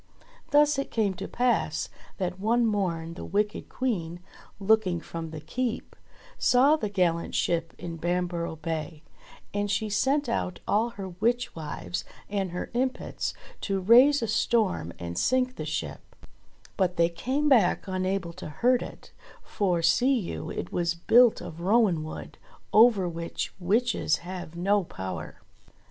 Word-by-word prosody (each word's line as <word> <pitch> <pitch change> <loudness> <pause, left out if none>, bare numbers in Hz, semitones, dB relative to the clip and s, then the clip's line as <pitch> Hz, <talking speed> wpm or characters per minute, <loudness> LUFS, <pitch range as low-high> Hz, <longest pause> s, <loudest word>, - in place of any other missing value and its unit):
Thus 295 -1 +4
it 275 - -3
came 210 -4 +1
to 190 +2 -6
pass 235 -10 0 0.3
that 180 -1 -3
one 230 +4 +2
morn 175 -6 -1
the - - -8
wicked 210 +2 -1
Queen, 175 -10 -2 0.4
looking 195 -4 +2
from 165 0 -6
the 155 -1 -7
Keep, 235 +10 -3 0.4
saw 270 +5 +5
the 215 -9 -3
gallant 175 -4 0
ship 165 -1 0
in 170 -1 -6
Bamborough 175 0 -1
Bay, 160 -1 -5 0.5
and 205 0 -1
she 215 +2 0
sent 275 +6 +1
out 185 -6 -2
all 220 +3 +2
her 200 -5 -7
witch 230 +7 -1
wives 90 - -5 0.3
and 195 -2 -1
her 175 +1 -5
impets 255 +2 -2 0.3
to 195 -1 -1
raise 245 +8 +6
a - - 0
storm, 210 - +1
and 85 0 -4
sink 255 0 +1
the - - -5
ship; - - -3 0.8
but 180 -2 +1
they 170 0 +5
came 260 - -1
back 230 -11 +4
unable 185 -2 -2
to - - -8
hurt 245 +10 +2
it, - - -9 0.3
for, 180 -5 0
see 255 +10 +4
you, 80 - -5
it 90 - -5
was 170 -1 0
built 235 +7 +5
of 165 +1 -8
rowan 195 -4 +3
wood, 155 - -8 0.3
over 215 -4 +6
which 170 0 -4
witches 210 -3 +1
have 180 -2 -7
no 195 +3 +2
power. 95 - -7
190 Hz, 150 wpm, -27 LUFS, 170-235 Hz, 0.8 s, raise